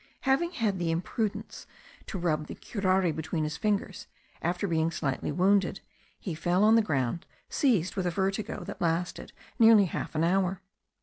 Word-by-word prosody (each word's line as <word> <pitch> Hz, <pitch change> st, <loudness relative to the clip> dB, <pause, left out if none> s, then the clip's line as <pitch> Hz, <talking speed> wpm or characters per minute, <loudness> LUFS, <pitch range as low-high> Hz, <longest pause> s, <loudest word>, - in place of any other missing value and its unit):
Having 310 Hz, +6 st, +1 dB
had 215 Hz, -, 0 dB
the 170 Hz, -1 st, -1 dB
imprudence 190 Hz, +6 st, -3 dB, 0.4 s
to 195 Hz, -, -4 dB
rub 155 Hz, -4 st, -1 dB
the -, -, -7 dB
curare 190 Hz, -5 st, 0 dB
between 160 Hz, +1 st, -2 dB
his 155 Hz, +1 st, -2 dB
fingers 200 Hz, +1 st, -2 dB, 0.3 s
after 175 Hz, +3 st, -1 dB
being 165 Hz, -2 st, +1 dB
slightly 140 Hz, -5 st, -2 dB
wounded, 195 Hz, +1 st, +2 dB, 0.4 s
he 180 Hz, -, -4 dB
fell 175 Hz, +4 st, +1 dB
on 215 Hz, +1 st, +6 dB
the 230 Hz, -, +6 dB
ground 145 Hz, -, -1 dB, 0.2 s
seized 215 Hz, -, +1 dB
with 190 Hz, -2 st, -1 dB
a -, -, +2 dB
vertigo, 195 Hz, +1 st, -2 dB
that -, -, -8 dB
lasted 170 Hz, +1 st, -1 dB, 0.3 s
nearly 225 Hz, -3 st, +7 dB
half 170 Hz, -, -5 dB
an 155 Hz, -, +1 dB
hour. 190 Hz, +2 st, +1 dB
185 Hz, 165 wpm, -28 LUFS, 165-205 Hz, 0.4 s, nearly